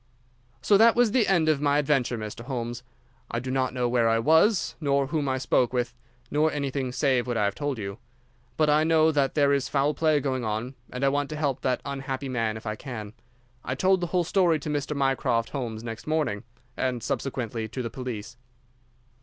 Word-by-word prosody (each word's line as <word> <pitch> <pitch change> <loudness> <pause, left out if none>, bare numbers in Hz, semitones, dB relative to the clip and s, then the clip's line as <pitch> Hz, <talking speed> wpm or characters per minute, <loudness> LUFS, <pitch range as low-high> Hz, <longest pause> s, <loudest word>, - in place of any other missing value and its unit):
"So 205 - +5
that 225 +2 +6
was 240 -2 +4
the 230 -2 +3
end 170 -5 +3
of 155 -3 +2
my 145 -1 +3
adventure, 135 -5 +1
Mr. 110 +2 -7
Holmes. 120 -2 -4 0.5
I - - -3
do 130 +1 -5
not 130 -1 0
know 125 -1 -1
where 120 -1 +2
I 115 - +3
was, 160 - +3
nor 140 -2 +2
whom 145 0 -1
I 130 - 0
spoke 130 -1 +1
with, 125 -1 -1 0.4
nor 155 +2 +2
anything 140 -3 -2
save 130 -2 +1
what 120 -2 -1
I 105 - +2
have 100 - 0
told 145 0 -3
you. 100 0 -6 0.6
But 155 - +3
I 150 +1 +4
know 160 0 +4
that 140 -3 +1
there 140 -2 +4
is 140 -2 0
foul 145 +1 +1
play 155 -2 +2
going 130 -3 -2
on, 110 +4 -3 0.2
and 125 +2 -2
I - - +5
want 145 0 -1
to 155 - -5
help 140 -4 -1
that 130 -1 0
unhappy 135 -1 -4
man 115 -3 -1
if 110 - -12
I 110 -1 -2
can. 110 -4 -7 0.5
I 130 - -3
told 190 +5 +2
the 175 - -1
whole 175 +1 +1
story 175 -2 +2
to 150 - -5
Mr. 145 0 -2
Mycroft 130 -4 +1
Holmes 115 -5 -4
next 115 +2 -7
morning, 155 -11 -1 0.3
and 125 -3 -2
subsequently 120 -4 -3
to 125 +3 -5
the 115 - -4
police." 120 -3 -6
135 Hz, 210 wpm, -26 LUFS, 120-150 Hz, 0.6 s, that